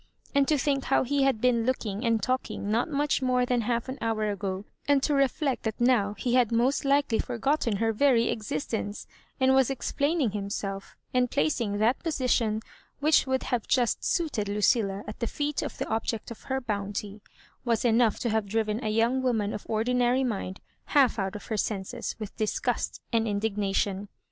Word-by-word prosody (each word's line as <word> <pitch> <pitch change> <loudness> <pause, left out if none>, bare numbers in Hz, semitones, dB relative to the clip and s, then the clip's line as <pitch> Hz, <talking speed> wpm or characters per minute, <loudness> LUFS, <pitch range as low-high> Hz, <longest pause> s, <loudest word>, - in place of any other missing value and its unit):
And 280 -1 +3
to 305 - +3
think 275 0 0
how 270 - +3
he 280 +2 0
had 270 -5 +2
been 245 -2 +3
looking 225 -4 -2
and 230 -3 +1
talking 255 -5 -2
not 235 +8 +1
much 290 -1 0
more 250 -1 +2
than 245 -1 +1
half 235 +1 -1
an 260 +1 -6
hour 215 -2 0
ago, 195 0 -4 0.2
aud 280 -2 +4
to 300 - +2
reflect 275 -1 +1
that 220 -2 -3
now 235 -5 +3
he 245 - -1
had 250 -3 +4
roost 245 +6 +2
likely 280 -4 +2
forgotten 245 -1 0
her 225 +2 +1
very 235 -1 +3
existence, 205 +1 -3 0.3
and 260 0 +4
was 265 -1 +4
explaining 280 0 0
himself, 200 -1 -4 0.2
and 250 -1 +2
plac 155 +4 +1
ing 205 -3 -1
that 225 +5 +2
position 250 -8 0 0.4
which 300 0 +4
would 260 0 0
have 240 -3 -2
just 245 -3 +1
suited 290 - 0
Lucilla 205 -1 +1
at 210 - -8
the 235 - -2
leet 290 0 0
of - - -5
the - - -3
object 225 0 -2
of 230 - -10
her 265 0 -1
bounty, 205 -3 -4 0.4
was 235 -2 0
enough 230 -2 +3
to 240 - 0
have 220 -2 0
driven 220 +1 -1
a 215 - 0
young 230 +4 +2
woman 225 -5 0
of 210 - -7
ordinary 245 +3 +2
mind 195 -6 -3 0.3
half 270 -6 +3
out 195 +1 -2
of 210 - -7
her 220 - -3
senses 195 -2 -3
with 215 -2 -7
disgust 215 -1 -1
and 225 -1 +2
indignation. 200 -1 -1
230 Hz, 185 wpm, -27 LUFS, 210-260 Hz, 0.4 s, aud